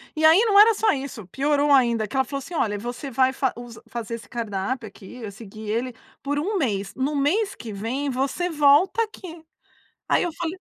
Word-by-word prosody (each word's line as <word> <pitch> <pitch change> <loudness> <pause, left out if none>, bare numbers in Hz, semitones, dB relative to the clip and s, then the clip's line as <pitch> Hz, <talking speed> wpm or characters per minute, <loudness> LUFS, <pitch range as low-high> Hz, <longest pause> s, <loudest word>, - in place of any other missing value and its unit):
e 315 - -2
aí 320 +5 +7
não 405 -2 +5
era 445 +2 +8
só 435 0 +2
isso, 265 -7 -6
piorou 285 +5 +1
ainda, 235 -5 +3
que 270 - -9
ela 265 - +3
falou 275 +2 -5
assim: 335 +6 -10
"Olha, 210 -9 0
você 245 +6 -6
vai 260 +1 +2
faz 265 -1 0
us 240 -2 -10
fazer 230 0 -5
esse 230 - -12
cardápio 230 +1 -3
aqui, 215 +4 -12
vai 210 -2 -6
seguir 215 0 -10
ele 240 +4 -1 0.3
por 285 +1 -2
um 395 +7 -1
mês, 200 - -1
no 275 +3 -1
mês 390 +9 +1
que 220 -3 -8
vem 250 +8 -3
você 275 +7 -1
volta 300 +7 +4
aqui", 345 -6 -10 0.6
aí - - +3
eu 350 - -2
falei: 340 +2 -4
265 Hz, 205 wpm, -24 LUFS, 230-315 Hz, 0.6 s, era